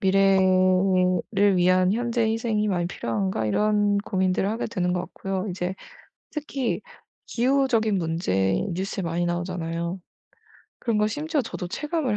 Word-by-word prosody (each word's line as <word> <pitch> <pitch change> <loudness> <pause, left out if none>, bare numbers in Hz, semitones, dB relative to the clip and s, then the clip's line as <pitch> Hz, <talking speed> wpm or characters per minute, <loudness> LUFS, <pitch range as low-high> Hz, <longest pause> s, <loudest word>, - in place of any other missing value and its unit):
미래를 190 0 +3
위한 185 +1 +4
현재 235 0 0
희생이 220 -1 0
많이 175 -3 0
필요한가?' 110 - -2
이런 205 - +2
고민들을 190 -1 0
하게 225 +2 -2
되는 180 -5 -1
것 180 - 0
같고요. 190 +2 -4
이제 180 +1 -3 0.6
특히 285 -4 -2 0.5
기후적인 240 -5 +2
문제 95 - 0
뉴스에 190 +1 -3
많이 170 +1 -1
나오잖아요. 175 0 -3 0.8
그런 230 -3 0
거 210 - +3
심지어 300 +4 -1
저도 180 -5 -6
체감을 295 - -1
190 Hz, 300 characters per minute, -25 LUFS, 180-220 Hz, 0.8 s, 위한